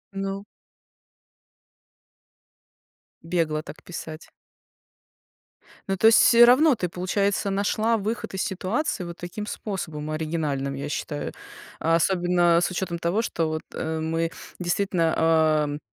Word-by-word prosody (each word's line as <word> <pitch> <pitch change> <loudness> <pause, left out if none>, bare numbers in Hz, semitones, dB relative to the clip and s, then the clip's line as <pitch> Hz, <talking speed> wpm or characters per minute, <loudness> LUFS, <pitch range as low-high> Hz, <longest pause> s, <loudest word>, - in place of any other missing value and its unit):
Ну 195 +1 -4 2.8
Бегло 165 -3 -1
так 145 - -11
писать. 160 -2 -8 1.6
Ну, 195 - -1
то 220 - +5
есть 225 - +7
всё 235 0 +8
равно 265 +4 +5
ты, 180 -5 -2
получается, 195 +3 -1
нашла 215 +3 +1
выход 215 +1 -4
из 190 - -2
ситуации 195 - -2
вот 170 -1 -7
таким 190 +5 -6
способом 160 -8 -5
оригинальным, 155 -4 -2
я 140 +2 -4
считаю, 145 0 -4 0.5
а 165 +1 +2
особенно 175 -1 +3
с 175 - 0
учетом 175 -2 -3
того, 175 +6 0
что 165 -8 -1
вот, 155 0 -3
э, 160 0 -3
мы 165 +1 -1 0.3
действительно, 175 -2 0
ам, 155 -2 +2
175 Hz, 120 wpm, -25 LUFS, 160-195 Hz, 2.8 s, всё